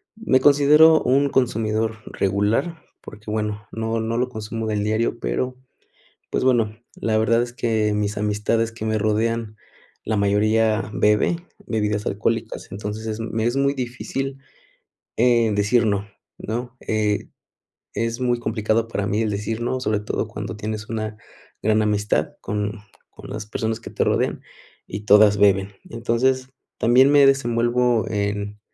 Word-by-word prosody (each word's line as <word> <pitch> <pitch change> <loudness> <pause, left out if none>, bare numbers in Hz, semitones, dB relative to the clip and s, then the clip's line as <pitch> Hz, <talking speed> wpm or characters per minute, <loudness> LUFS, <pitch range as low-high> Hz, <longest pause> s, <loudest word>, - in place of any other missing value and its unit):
me 175 -12 +2
considero 150 +3 +6
un 140 +2 +3
consumidor 110 -3 0
regular 105 - 0 0.2
porque, 105 0 -11
bueno, 105 -1 -3
no 115 0 -2
no 115 +1 -2
lo 125 +1 0
consumo 110 -1 -5
del 105 -1 -1
diario, 110 +2 0
pero, 125 - -2 0.8
pues, - - 0
bueno, 115 -4 +2 0.2
la 110 -1 0
verdad 115 +2 +3
es 120 0 -6
que 110 -3 0
mis 105 0 -1
amistades 105 +2 0
que 115 -1 -7
me 110 0 0
rodean, 110 +1 -1 0.5
la 110 - -1
mayoría 110 +2 +2
bebe 105 +12 +2 0.3
bebidas 105 -2 -1
alcohólicas, 115 +2 -2
entonces, 105 +3 -5
es 110 0 -4
me 115 0 -2
es 120 +2 0
muy 140 0 +2
difícil, 135 +2 -4 0.8
eh, 120 -2 +4
decir 105 +4 +2
no, 100 -2 0 0.3
¿no?, 120 +3 -5
eh, 105 -1 -1 0.7
es 115 +1 -2
muy 120 -1 +1
complicado 110 0 0
para 100 -3 -2
mí 105 +2 0
el 110 - -1
decir 105 +2 -3
no, 120 +2 -1
sobre 110 -4 0
todo 105 - -2
cuando 105 +1 -6
tienes 110 0 -5
una 110 -1 -4 0.5
gran 110 0 +3
amistad 105 0 0
con 105 0 -2 0.4
con - - -12
las 105 0 -5
personas 110 +1 -2
que - - -9
te - - -2
rodean, - - +1 0.5
y 100 - -5
todas 105 0 +6
beben. 100 -1 +3 0.2
Entonces, 125 +3 0 0.3
también 125 +4 +5
me 145 -1 +7
desenvuelvo 120 -3 +2
en 105 0 -2
110 Hz, 150 wpm, -22 LUFS, 105-120 Hz, 0.8 s, me